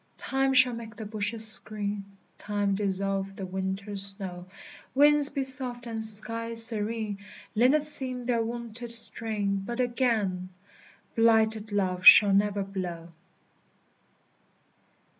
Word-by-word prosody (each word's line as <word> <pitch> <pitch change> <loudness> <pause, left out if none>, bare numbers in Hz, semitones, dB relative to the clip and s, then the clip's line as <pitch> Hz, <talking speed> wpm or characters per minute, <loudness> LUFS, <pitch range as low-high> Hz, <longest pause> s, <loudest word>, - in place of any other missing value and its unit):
Time 270 0 -2
shall 255 -1 +3
make 230 -1 -10
the 220 - -9
bushes 215 +1 0
green; 205 -1 -6 0.4
Time 205 -1 -3
dissolve 195 0 -4
the 195 - -7
winter 190 +2 -6
snow; 195 -2 -5 0.5
Winds 295 +1 +6
be 275 - -4
soft, 255 -2 -5
and 225 -1 -5
skies 230 +1 +6
serene; 215 -2 -1 0.3
Linnets 275 +7 +2
sing 255 -4 -3
their 235 -2 -1
wonted 235 +1 -7
strain: 220 -3 +1
But 235 +4 -7
again 225 -7 -2 0.7
Blighted 220 -1 +1
love 185 -3 -3
shall 200 +2 +7
never 200 0 0
blow! 180 -4 -8
220 Hz, 115 wpm, -26 LUFS, 200-235 Hz, 0.7 s, shall